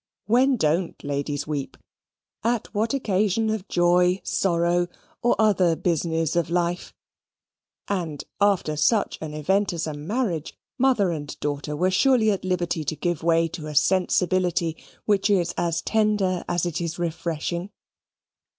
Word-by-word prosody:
When 255 +4 +3
don't 165 0 0
ladies 145 0 -2
weep? 145 -3 -4 0.7
At 235 0 -1
what 225 +5 0
occasion 215 -2 +1
of 215 -3 -3
joy, 180 +1 +3
sorrow, 175 -1 +1 0.3
or 240 - +3
other 190 -6 +3
business 165 -2 0
of 170 -1 +1
life, 175 0 -1 1.0
and, 170 -7 -3 0.2
after 195 -6 +2
such 200 +8 +1
an 155 -1 -5
event 190 +6 +1
as 165 -1 -2
a 155 - -4
marriage, 165 - -3 0.2
mother 245 -8 +3
and 145 -3 -6
daughter 145 0 -3
were 185 +5 +1
surely 225 +1 +4
at 195 - -2
liberty 175 -3 -1
to 155 - -2
give 175 0 -2
way 165 0 +3
to 155 -2 -7
a 150 - -6
sensibility 180 0 +2 0.3
which 205 -1 +2
is 175 -4 +2
as 170 -1 -1
tender 210 -4 +1
as 175 -1 0
it 175 -1 -2
is 165 -1 -3
refreshing. 170 +1 -3
175 Hz, 140 wpm, -24 LUFS, 160-200 Hz, 1.0 s, surely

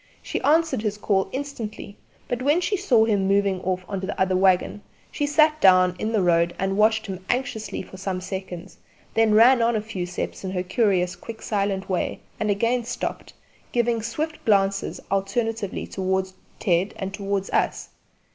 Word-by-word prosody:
She - - -3
answered 320 -5 +2
his 210 -2 -2
call 195 -2 0
instantly, 240 -7 -6 0.3
but 245 0 -2
when 290 +6 +3
she 360 +3 0
saw 255 - +3
him 200 -4 +1
moving 195 -1 +2
off 185 0 -2
on 195 -2 -3
the 190 +2 -5
other 190 0 +2
waggon 185 +2 +2 0.3
she 290 - -1
sat 305 +1 +3
down 185 -1 +6
in 220 - -1
the 215 -4 +2
road 170 -1 +2
and 195 0 -1
watched 220 +1 +3
him 190 -2 -6
anxiously 220 -6 -2
for 190 - -12
some 190 -1 -3
seconds, 185 -1 -7 0.3
then 225 -1 +3
ran 240 +3 +6
on 230 0 +2
a - - +1
few 205 -4 -5
steps 180 - -5
in 190 - -3
her 180 -1 -1
curious 185 -2 +1
quick 225 -1 -9
silent 200 -2 -1
way 185 -2 -2 0.2
and 215 - -1
again 230 +4 +1
stopped, 245 +2 -5 0.4
giving 235 -1 +1
swift 305 +8 -4
glances 195 -2 +1
alternately 210 +1 -1
towards 190 0 -2 0.3
Ted 180 +2 +1
and 195 0 -4
towards 195 -1 -2
us. - - 0
200 Hz, 175 wpm, -24 LUFS, 190-230 Hz, 0.4 s, down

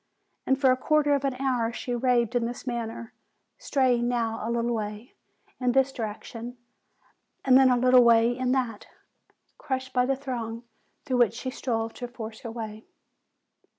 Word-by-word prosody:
And 265 0 +2
for 265 -2 +5
a 255 - +2
quarter 295 +2 +2
of 280 -1 +1
an 270 -2 0
hour 250 -3 0
she 245 +1 -4
raved 240 -1 +1
in 240 -1 +2
this 245 +1 -7
manner, 235 -2 -5 0.5
straying 250 -4 +1
now 230 -2 -1
a 225 - -3
little 235 0 0
.way 215 +2 -5 0.5
.in 250 -1 +1
this 270 +1 +3
direction, 230 +1 -6 0.9
and 260 -1 +6
then 265 0 +7
a 250 - +3
little 250 0 +6
way 235 0 +5
in 255 0 -1
that, 245 -5 -1 0.7
crushed 260 -1 -4
by 250 0 +2
the 270 - +1
throng 240 -4 -5 0.4
through 260 -4 0
which 235 -2 +3
she 260 +2 -4
strove 225 -4 -2
to 245 - -6
force 225 -2 -8
her 235 - -7
way. 220 -1 -7
245 Hz, 170 wpm, -26 LUFS, 230-260 Hz, 0.9 s, then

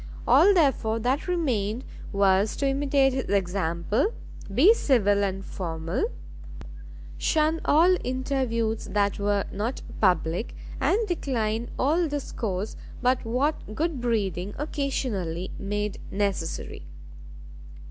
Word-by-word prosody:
All 405 - +7
therefore 270 -9 +2
that 250 +8 0
remained 250 - -1 0.3
was 200 +1 +3
to 280 - 0
imitate 275 -1 +2
his 260 -5 -3
example, 190 - 0 0.4
be 310 - +6
civil 205 - +2
and 195 -1 -2
formal, 165 - -3 1.1
shun 315 +1 +2
all 340 +5 +5
interviews 250 -4 -1
that 200 0 0
were 200 -1 +1
not 220 +6 -3 0.2
public, 180 +1 +1 0.2
and 390 - +2
decline 235 - -1
all 320 +6 +2
discourse 220 -9 -3 0.3
but 250 +1 +2
what 250 -1 -1
good 315 -3 -1
breeding 205 -5 -1
occasionally 235 - -2
made 205 0 -3
necessary. 190 - -3
225 Hz, 105 wpm, -26 LUFS, 195-275 Hz, 1.1 s, All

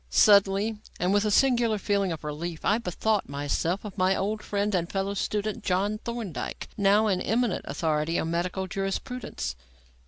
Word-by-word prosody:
Suddenly, 200 - +4 0.2
and 180 +2 +2
with 205 +1 +3
a - - +2
singular 235 -1 +3
feeling 200 -2 0
of 160 -2 -5
relief, 155 +2 -5
I 210 +3 +3
bethought 210 0 -1
myself 145 +7 -1
of 205 -1 -7
my 185 +1 +3
old 215 +2 -1
friend 205 0 -1
and 175 -2 0
fellow 195 0 -1
student, 210 +2 -2
John 200 +3 0
Thorndyke, 215 - -5
now 205 +1 +4
an 190 -4 +1
eminent 225 -1 0
authority 155 +2 0
on 165 - -1
Medical 180 +3 -1
Jurisprudence. 195 - -4
195 Hz, 160 wpm, -27 LUFS, 175-215 Hz, 0.2 s, Suddenly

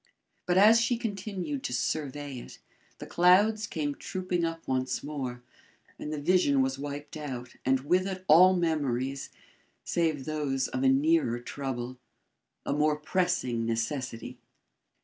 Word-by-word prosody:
But 180 0 +2
as 220 +4 +7
she 230 +1 +1
continued 195 - -4
to 125 - -4
survey 145 +1 -3
it, - - -11 0.4
the - - -8
clouds 205 +5 +4
came 145 -5 -2
trooping 180 +2 -3
up 165 0 -3
once 130 0 -1
more, 130 -4 -5 0.6
and 150 - -5
the 155 - -3
vision 145 -4 +3
was 135 +1 -2
wiped 145 +1 -6
out 130 -5 -6
and 130 0 +2
with 180 +7 +1
it 185 -1 -5
all 185 +4 +7
memories 140 -6 -1 0.5
save 160 -5 0
those 145 -4 -1
of 130 - -3
a 135 - +4
nearer 140 -2 +3
trouble 130 -1 -5 0.7
a - - 0
more 150 +1 +2
pressing 150 -7 0
necessity. 120 +1 -3
145 Hz, 140 wpm, -29 LUFS, 130-180 Hz, 0.7 s, as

